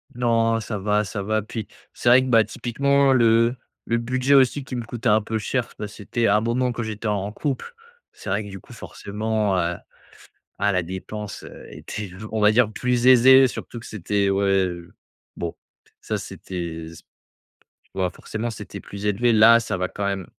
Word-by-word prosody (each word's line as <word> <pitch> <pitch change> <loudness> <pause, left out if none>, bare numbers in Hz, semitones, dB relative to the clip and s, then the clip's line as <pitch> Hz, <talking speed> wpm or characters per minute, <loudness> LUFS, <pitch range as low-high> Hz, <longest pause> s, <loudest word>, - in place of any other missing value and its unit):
Non 115 -2 +2
ça 110 -1 -4
va, 105 +2 +1
ça 100 0 -5
va, 110 +2 0
puis 110 +1 -6 0.3
c'est - - -5
vrai 125 +2 +7
que, - - -3
bah, 115 -2 +6
typiquement 140 +5 +1
le 115 0 +4 0.3
le 115 - +1
budget 130 +3 0
aussi 135 +1 +4
qui 130 - -7
me 120 - -3
coûtait 120 0 -2
un 105 +1 +4
peu 110 +1 -3
cher, 120 +3 -2
bah, 105 - -3
c'était 110 +3 -2
un 100 +1 +4
moment 125 +2 0
quand 120 0 -4
j'étais 110 0 -5
en 100 -1 -1
couple. 140 - -4 0.4
C'est - - -9
vrai 100 +3 0
que 105 - -9
du 95 -1 -8
coup, - - -18
forcément, 105 -1 -2
heu, 85 0 -1 0.8
ah 100 0 +2
la 90 -1 +1
dépense 95 +4 -7 0.2
était, 105 -3 -7 0.2
on 110 - 0
va 105 0 +6
dire, 110 -1 +3
plus 125 +1 0
aisée, 130 +1 +8
surtout 120 -1 -7
que 115 - -12
c'était 100 0 -1
ouais, 95 -1 +2 0.7
bon 85 -1 -4 0.5
ça - - -2
c'était 85 -3 -6
s 85 0 -12 0.8
tu - - -36
vois? 95 -2 0
Forcément, 110 +5 -5
c'était 115 - -8
plus 100 +1 -9
élevé, 115 +4 +2
là, 115 +1 +7
ça 105 - -3
va 90 0 -2
quand 100 +2 -4
même 100 -2 -2
110 Hz, 190 wpm, -23 LUFS, 100-120 Hz, 0.8 s, aisée